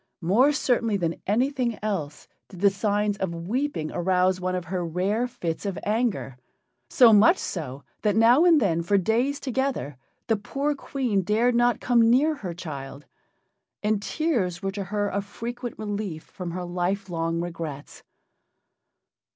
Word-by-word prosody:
More 230 Hz, -, +4 dB
certainly 235 Hz, -7 st, +1 dB
than 170 Hz, -3 st, -2 dB
anything 245 Hz, +2 st, 0 dB
else 160 Hz, -9 st, -3 dB, 0.2 s
did 185 Hz, -3 st, -11 dB
the 200 Hz, -1 st, +5 dB
signs 205 Hz, +1 st, 0 dB
of 190 Hz, -4 st, -3 dB
weeping 240 Hz, -, -2 dB
arouse 185 Hz, +1 st, +1 dB
one 185 Hz, 0 st, -1 dB
of 180 Hz, -1 st, -3 dB
her 180 Hz, +1 st, -3 dB
rare 190 Hz, +8 st, 0 dB
fits 170 Hz, -9 st, -4 dB
of 195 Hz, -3 st, -3 dB
anger 210 Hz, -, -1 dB, 0.5 s
so 230 Hz, -, +6 dB
much 220 Hz, -, +6 dB
so 140 Hz, -6 st, -5 dB, 0.2 s
that 210 Hz, -2 st, +1 dB
now 235 Hz, +7 st, +6 dB
and 340 Hz, -3 st, +6 dB
then, 170 Hz, -8 st, +1 dB
for 200 Hz, +4 st, +2 dB
days 235 Hz, +9 st, +1 dB
together, 265 Hz, -, -2 dB, 0.3 s
the 225 Hz, -, +1 dB
poor 275 Hz, +8 st, -2 dB
Queen 255 Hz, -7 st, -1 dB
dared 220 Hz, +6 st, +2 dB
not 240 Hz, 0 st, +3 dB
come 235 Hz, -2 st, +3 dB
near 285 Hz, +6 st, +4 dB
her 190 Hz, -, -6 dB
child, 145 Hz, -4 st, -7 dB, 0.8 s
and 210 Hz, -1 st, +1 dB
tears 215 Hz, -, -1 dB
were 195 Hz, -, -1 dB
to 200 Hz, 0 st, -5 dB
her 205 Hz, +2 st, -1 dB
a 200 Hz, -, -1 dB
frequent 235 Hz, +4 st, -6 dB
relief 205 Hz, -6 st, -4 dB
from 180 Hz, -3 st, -7 dB
her 180 Hz, +1 st, -4 dB
lifelong 175 Hz, -2 st, -2 dB
regrets. 165 Hz, -4 st, -6 dB
205 Hz, 150 wpm, -25 LUFS, 175-240 Hz, 0.8 s, so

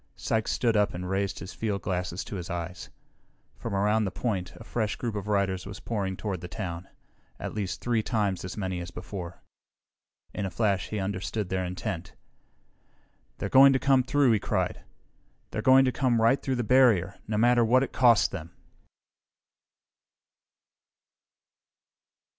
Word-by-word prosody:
Sykes 110 Hz, -1 st, -1 dB
stood 115 Hz, -2 st, +1 dB
up 105 Hz, -3 st, +2 dB
and 90 Hz, +1 st, -4 dB
raised 95 Hz, +1 st, -1 dB
his 95 Hz, -, -8 dB
fieldglasses 95 Hz, -4 st, -2 dB
to 100 Hz, -, -6 dB
his 90 Hz, +1 st, -6 dB
eyes. 85 Hz, 0 st, -5 dB, 0.7 s
From -, -, -4 dB
around 105 Hz, +2 st, +2 dB
the -, -, -1 dB
point 95 Hz, -6 st, -2 dB
a -, -, -11 dB
fresh 110 Hz, -4 st, -2 dB
group 120 Hz, -3 st, -3 dB
of 105 Hz, -1 st, -5 dB
riders 100 Hz, -2 st, 0 dB
was 100 Hz, -1 st, -8 dB
pouring 100 Hz, -5 st, -3 dB
toward 95 Hz, -5 st, -4 dB
the 90 Hz, -, -6 dB
town. 90 Hz, -2 st, -5 dB, 0.5 s
At -, -, -5 dB
least 100 Hz, -3 st, -3 dB
three 120 Hz, -2 st, +1 dB
times 105 Hz, -5 st, -1 dB
as 95 Hz, -, -6 dB
many 95 Hz, -3 st, -2 dB
as 85 Hz, 0 st, -6 dB
before. 90 Hz, -1 st, -8 dB, 0.9 s
In 105 Hz, -, -3 dB
a 95 Hz, -, -1 dB
flash, 100 Hz, -3 st, 0 dB
he 110 Hz, -, -3 dB
understood 100 Hz, +1 st, -3 dB
their 95 Hz, 0 st, -1 dB
intent. 90 Hz, 0 st, -5 dB, 1.2 s
"They're -, -, -3 dB
going 135 Hz, +5 st, +7 dB
to -, -, +3 dB
come 135 Hz, 0 st, +4 dB
through!" 130 Hz, 0 st, +3 dB
he 110 Hz, -, +3 dB
cried. -, -, -1 dB, 0.7 s
"They're -, -, -2 dB
going 130 Hz, 0 st, +6 dB
to 130 Hz, -, +2 dB
come 125 Hz, -3 st, +1 dB
right 115 Hz, +5 st, +3 dB
through 130 Hz, -, -1 dB
the 120 Hz, -, -1 dB
barrier, 110 Hz, -7 st, +4 dB
no 105 Hz, -1 st, -1 dB
matter 120 Hz, +2 st, +4 dB
what 125 Hz, +4 st, +4 dB
it -, -, -5 dB
costs 120 Hz, -3 st, +5 dB
them!" 85 Hz, -2 st, -8 dB
100 Hz, 160 wpm, -27 LUFS, 95-115 Hz, 1.2 s, going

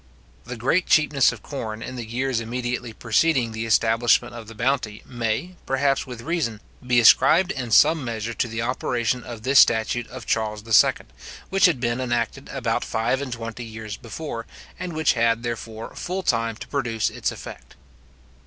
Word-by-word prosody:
The 125 Hz, +1 st, -6 dB
great 140 Hz, +10 st, +1 dB
cheapness 150 Hz, -3 st, +4 dB
of -, -, -11 dB
corn 115 Hz, -5 st, -5 dB
in 130 Hz, -, -6 dB
the 120 Hz, -, -5 dB
years 125 Hz, +2 st, -1 dB
immediately 120 Hz, +1 st, -3 dB
preceding 120 Hz, +2 st, +1 dB
the 110 Hz, +1 st, -4 dB
establishment 115 Hz, +2 st, +3 dB
of 115 Hz, -2 st, -9 dB
the 115 Hz, -, -11 dB
bounty 120 Hz, -2 st, -1 dB
may, 120 Hz, +9 st, -3 dB
perhaps 135 Hz, +1 st, +1 dB
with 125 Hz, -2 st, -8 dB
reason, 140 Hz, -9 st, -2 dB, 0.2 s
he 125 Hz, -1 st, +3 dB
ascribed 175 Hz, -, +6 dB
in 130 Hz, -7 st, -4 dB
some 155 Hz, +7 st, +5 dB
measure 115 Hz, -1 st, -4 dB
to 120 Hz, -, -1 dB
the 115 Hz, 0 st, -3 dB
operation 125 Hz, 0 st, -1 dB
of 115 Hz, -3 st, -9 dB
this 135 Hz, +2 st, +5 dB
statute 115 Hz, +1 st, +3 dB
of -, -, -9 dB
Charles 105 Hz, -2 st, -1 dB
II. 110 Hz, -, +6 dB, 0.6 s
which 195 Hz, 0 st, +4 dB
had 160 Hz, -8 st, 0 dB
been 120 Hz, +1 st, -1 dB
enacted 120 Hz, -2 st, -2 dB
about -, -, -1 dB
five 115 Hz, +4 st, -1 dB
and 140 Hz, -2 st, -5 dB
twenty 115 Hz, 0 st, -6 dB
years 110 Hz, -2 st, -7 dB
before, 115 Hz, +1 st, -7 dB, 0.3 s
and 180 Hz, -1 st, -5 dB
which 155 Hz, -1 st, +2 dB
had, 115 Hz, -1 st, +1 dB
therefore, 115 Hz, -1 st, -5 dB
full 185 Hz, +2 st, -4 dB
time 115 Hz, -6 st, 0 dB
to -, -, -10 dB
produce 120 Hz, -6 st, -1 dB
its -, -, -2 dB
effect. -, -, -11 dB
120 Hz, 170 wpm, -23 LUFS, 115-135 Hz, 0.6 s, ascribed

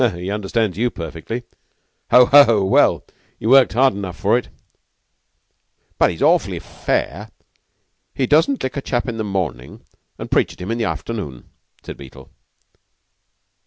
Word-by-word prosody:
"He 90 Hz, +3 st, -5 dB
understands 105 Hz, -1 st, -2 dB
you 120 Hz, +1 st, +1 dB
perfectly. 85 Hz, +6 st, -7 dB, 0.7 s
Ho! 125 Hz, 0 st, +7 dB
ho! 120 Hz, -8 st, +5 dB
Well, 95 Hz, -, +3 dB, 0.3 s
you 110 Hz, -, -3 dB
worked 135 Hz, -2 st, +5 dB
hard 130 Hz, +3 st, +3 dB
enough 95 Hz, -3 st, -6 dB
for 105 Hz, +3 st, +2 dB
it." 125 Hz, -, -2 dB, 1.5 s
"But -, -, +4 dB
he's -, -, -4 dB
awfully -, -, +2 dB
fair. -, -, -3 dB, 0.9 s
He 135 Hz, -, 0 dB
doesn't 160 Hz, -, +2 dB
lick 130 Hz, -, -3 dB
a 140 Hz, -, -3 dB
chap 120 Hz, -1 st, -2 dB
in 115 Hz, -2 st, -4 dB
the 110 Hz, -, -2 dB
morning 90 Hz, -, -5 dB, 0.3 s
an' -, -, -8 dB
preach -, -, +1 dB
at -, -, -20 dB
him 90 Hz, +4 st, -5 dB
in 115 Hz, -, -2 dB
the 115 Hz, -, 0 dB
afternoon," 95 Hz, -, -6 dB, 0.3 s
said -, -, -9 dB
Beetle. 65 Hz, 0 st, -14 dB
110 Hz, 150 wpm, -19 LUFS, 90-125 Hz, 1.5 s, Ho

